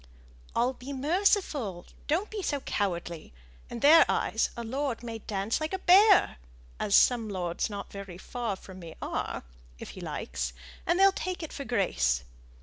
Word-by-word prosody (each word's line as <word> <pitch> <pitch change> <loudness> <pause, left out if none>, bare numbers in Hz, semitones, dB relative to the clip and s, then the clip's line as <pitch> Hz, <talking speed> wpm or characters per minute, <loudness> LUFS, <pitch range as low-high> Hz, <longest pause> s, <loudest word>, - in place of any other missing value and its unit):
"I'll 245 +2 +2
be 260 +2 -8
merciful; 290 - +1 0.2
don't 350 +8 0
be 430 -2 -4
so 290 -6 -1
cowardly. 175 - -3 0.4
In 235 - -6
their 320 +3 +8
eyes - - +1
a 235 - -4
lord 255 0 -3
may 230 -1 -5
dance 205 +4 -2
like 310 +4 -3
a - - +1
bear 385 +2 +6 0.4
as 200 - +2
some 235 -3 +4
lords 180 -2 -2
not 200 -1 -7
very 195 -3 -8
far 230 +1 -4
from 190 0 -12
me 165 -2 -10
are - - -3 0.3
if - - -9
he - - -10
likes, - - -4 0.3
and 345 - +3
they'll 390 0 +7
take 370 -2 -4
it 315 - -7
for 280 - -6
grace. 65 - +1
235 Hz, 165 wpm, -29 LUFS, 195-315 Hz, 0.4 s, their